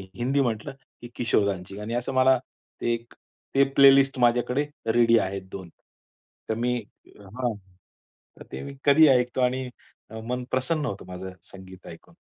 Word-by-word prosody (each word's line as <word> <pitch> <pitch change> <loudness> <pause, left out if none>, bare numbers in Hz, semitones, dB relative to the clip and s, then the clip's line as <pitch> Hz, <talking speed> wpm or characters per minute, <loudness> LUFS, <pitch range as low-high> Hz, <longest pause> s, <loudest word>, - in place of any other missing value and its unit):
हिंदी 135 +4 0
म्हटलं 115 0 -2 0.3
की 120 - -9
किशोरदांची 100 -5 -1
गाणी. 105 +3 -5
असं 125 +2 -3
मला 130 0 +4 0.4
ते 120 0 +1 0.6
ते 140 - +6
प्लेलिस्ट 135 -1 +6
माझ्याकडे 125 +4 +2 0.3
रेडी 115 -1 +5
आहेत 95 0 -3
2 95 -3 -8 0.8
तर 110 - 0
मी 125 +2 0 0.4
हां, 110 +4 -4 0.9
तर - - -10
ते - - -6
मी 140 0 -8
कधीही 150 +2 +7
ऐकतो 125 0 +2
आणि 125 0 0 0.6
मन 125 0 -2
प्रसन्न 145 +4 -1
होतं 100 -5 -5
माझं 90 +1 -7 0.2
संगीत 95 -1 -13
ऐकून. 160 - -13
120 Hz, 145 wpm, -25 LUFS, 100-130 Hz, 0.9 s, कधीही